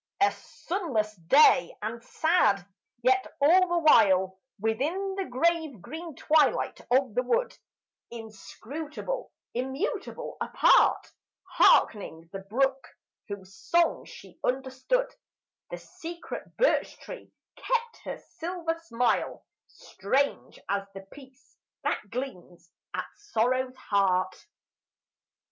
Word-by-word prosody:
A 400 - +5
sunless 260 - -3
day 265 - +5
and 230 +2 -4
sad: 305 - +2 0.4
yet 255 +1 +3
all 355 +6 +5
the 350 0 0
while 190 - +4 0.2
Within 300 - -1
the 390 0 -3
grave 315 - 0
green 320 - -8
twilight 310 +4 +2
of 255 -2 +2
the 250 - +2
wood, 470 - 0 0.5
inscrutable, 285 - -7 0.2
immutable, 270 - -3
apart, - - +4 0.4
Hearkening 165 -6 +3
the 195 - -4
brook, 265 +7 0 0.4
whose 195 -2 -8
song 340 +8 +1
she - - -14
understood, 270 - -1 0.6
The - - -5
secret 340 +1 -9
birch - - +2
tree - - -10 0.3
kept 475 -2 -1
her - - -4 0.2
silver 330 -1 -3
smile, 245 -7 -1 0.2
Strange 280 - -2
as 200 0 -1
the 195 - -7
peace 270 -1 -16 0.3
that 205 - -2
gleams 185 -9 -7 0.2
at - - -2
sorrow's 255 - 0
heart. 190 -5 +1
265 Hz, 105 wpm, -28 LUFS, 215-335 Hz, 0.6 s, A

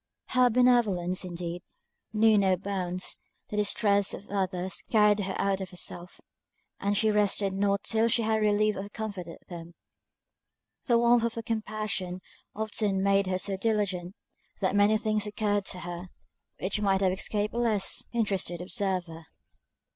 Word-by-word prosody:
Her 255 -1 +4
benevolence, 220 -8 +3
indeed, 175 -1 -5 0.5
knew 220 0 +4
no 190 -2 +3
bounds; 185 -1 -3 0.3
the 210 - -4
distress 205 -1 +2
of 205 - -12
others 190 -2 -2
carried 210 -2 +4
her 190 -1 -2
out 195 -1 0
of 190 - -5
herself; 180 0 -6 0.6
and 200 0 0
she 220 +1 +3
rested 205 -1 +1
not 200 +1 +1
till 225 0 +2
she 230 0 +1
had 220 0 +1
relieved 210 0 +2
or 200 +1 -6
comforted 200 -6 -6
them. 170 -1 -9 1.1
The 240 -2 +4
warmth 235 0 +4
of 230 - -2
her 230 - -4
compassion 215 -5 -3 0.3
often 210 -2 -1
made 195 0 +3
her 185 0 0
so 195 +1 -1
diligent, 195 -4 -1 0.4
that 190 0 0
many 205 +2 +5
things 215 -1 -1
occurred 205 -1 0
to 180 -2 -5
her, 175 +1 -6 0.5
which 200 +3 -1
might 195 -1 +2
have 190 -1 +3
escaped 205 +2 -1
a 235 - -2
less 220 -5 +1
interested 200 -7 -1
observer. 180 -4 -2
200 Hz, 150 wpm, -28 LUFS, 185-215 Hz, 1.1 s, many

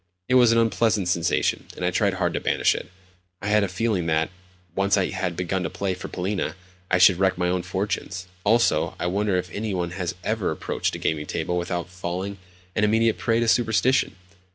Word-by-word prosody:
It - - 0
was 125 -2 +6
an 115 - +3
unpleasant 115 -4 +2
sensation, 85 -1 +1
and - - -3
I - - +2
tried - - +1
hard - - 0
to - - -1
banish - - +2
it. - - -6 0.5
I 100 - -3
had 105 0 +4
a - - +1
feeling 95 -2 -1
that, 80 +1 +1 0.4
once 100 +2 +2
I 95 -2 +1
had 95 -2 -2
begun 90 +2 -1
to 80 - -2
play 95 +2 -2
for 90 - -7
Polina, 95 +1 -2 0.3
I 90 - +3
should 90 0 +6
wreck 95 -1 +2
my 90 0 +1
own 90 0 0
fortunes. 95 0 -3 0.2
Also, 115 +3 +2
I - - -2
wonder 100 +2 +1
if 90 -2 -3
any 105 +1 -3
one 85 -1 -2
has 90 -1 -3
ever 110 -1 0
approached 80 - -2
a - - -4
gaming 75 -1 -1
table 85 +2 -2
without 85 0 -2
falling 95 +2 -5 0.4
an 105 - +1
immediate 110 +1 +3
prey 115 0 +1
to 115 - +1
superstition? 120 +2 +2
95 Hz, 205 wpm, -24 LUFS, 90-105 Hz, 0.5 s, was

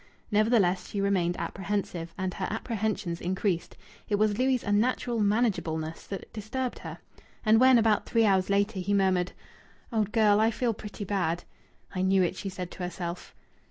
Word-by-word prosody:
Nevertheless, 210 -4 +3
she 200 - -4
remained 185 -3 +1
apprehensive, 190 -4 -3
and 185 -1 -2
her 185 - -3
apprehensions 215 -5 -2
increased. 185 -1 -1 0.3
It 205 - +2
was 210 0 +2
Louis' 255 -1 +2
unnatural 230 +3 +1
manageableness 200 -7 0
that 195 - -7
disturbed 240 +4 -3
her. - - -7 0.5
And 220 +1 +6
when, 260 0 +7
about 225 -2 +2
three 230 -1 +3
hours 190 -2 +3
later, 200 +1 +1
he 200 +3 0
murmured, 185 -2 +2 0.6
"Old 215 -2 +1
girl, 215 -3 +4
I 220 +1 +4
feel 230 +1 0
pretty 210 0 -7
bad." 175 -4 -1 0.5
"I 185 - -2
knew 190 0 +4
it," 180 - 0
she 195 - -5
said 180 -1 -6
to - - -12
herself. 175 -1 -5
200 Hz, 160 wpm, -28 LUFS, 185-220 Hz, 0.6 s, when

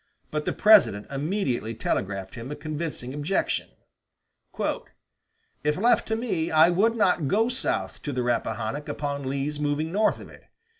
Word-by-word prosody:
But 150 0 -2
the - - 0
President 205 - +5
immediately 135 - -1
telegraphed 95 -2 -2
him 120 +1 -7
a 150 - -4
convincing 150 -3 -4
objection: 150 +7 -1 1.9
"If 150 0 +1
left 235 +6 +3
to 220 - 0
me, 215 -9 -1
I 160 +2 +6
would 220 +6 +3
not 180 -8 +2
go 220 - +2
south 250 - -2
of 145 - -2
the 125 - 0
Rappahannock 120 +3 -2
upon 140 -2 -3
Lee's 140 +2 -2
moving 150 +2 -1
north 210 +4 +2
of - - -10
it. - - -16
150 Hz, 150 wpm, -26 LUFS, 130-185 Hz, 1.9 s, I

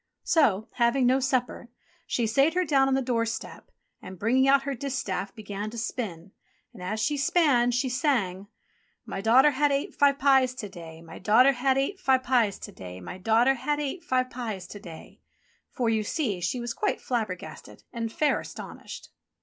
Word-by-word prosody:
So, 220 - +2
having 240 +2 +3
no 255 +2 +4
supper, 255 -2 -1 0.4
she 240 - 0
sate 275 +9 +2
her 365 0 +2
down 270 -4 +3
on 270 - +2
the 270 - 0
doorstep, 230 -2 -3 0.3
and, 185 0 -10
bringing 255 +7 +2
out 275 0 +5
her 280 0 -2
distaff, 250 -7 -4
began 210 -1 -5
to 235 - -9
spin. 205 -6 -5 0.4
And 210 - -12
as 195 +5 -3
she 290 +7 0
span 285 -6 +3
she 245 +2 0
sang: 240 - -1 0.6
"My - - -5
daughter 255 +7 +5
ha' 290 +2 +2
ate 280 0 -1
five 280 -1 +3
pies 265 -3 +3
to 210 -5 -6
day, 165 -3 -11
My 165 0 -11
daughter 240 +8 +5
ha' 265 +1 +1
ate 330 +9 -1
five 265 -7 +2
pies 240 -6 +2
to - - -9
day, 90 0 -10
My 180 - -8
daughter 225 +6 +3
ha' 270 +3 -2
ate 295 +4 -4
five 255 0 0
pies 220 -7 -5
to 205 - -9
day," 165 -4 -12 0.5
for, 235 -3 -1
see 220 - -1
you, - - -10
she 180 +8 -1
was 240 -1 -4
quite - - -1
flabbergasted 220 -7 -5
and 230 -2 -3
fair 300 +5 +1
astonished. - - -9
245 Hz, 180 wpm, -27 LUFS, 210-270 Hz, 0.6 s, out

